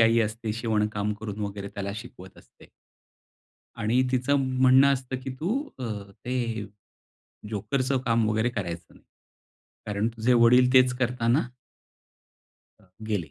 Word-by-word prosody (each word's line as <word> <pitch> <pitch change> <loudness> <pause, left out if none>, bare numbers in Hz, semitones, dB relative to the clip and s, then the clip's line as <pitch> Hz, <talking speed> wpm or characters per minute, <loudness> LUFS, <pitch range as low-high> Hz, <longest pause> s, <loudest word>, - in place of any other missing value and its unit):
आई 115 +1 +5
असते 110 0 -2
शिवणकाम 105 -2 -1
करून 105 -1 -6
वगैरे 100 -1 -4
त्याला 100 0 -5
शिकवत 95 -5 -11
असते. - - -20 1.1
आणि 115 +3 +2
तिचं 130 +3 +2 0.2
म्हणणं 130 +2 +6
असतं, 130 -1 -3
की 135 - -4
"तू 220 - 0 0.2
अ, 130 - -4 0.4
ते 115 -4 -2 0.8
जोकरच 115 +6 -1
काम 115 -1 +2
वगैरे 110 +2 +1
करायचं 90 -7 -6
नाही. - - -21 0.8
कारण 105 +1 0
तुझे 115 +1 0
वडील 125 +1 +5
तेच 130 -1 +6
करतांना" 125 +1 +1 1.4
अ, 95 - -24 0.2
गेले. 85 -8 -2
115 Hz, 125 wpm, -26 LUFS, 105-125 Hz, 1.4 s, म्हणणं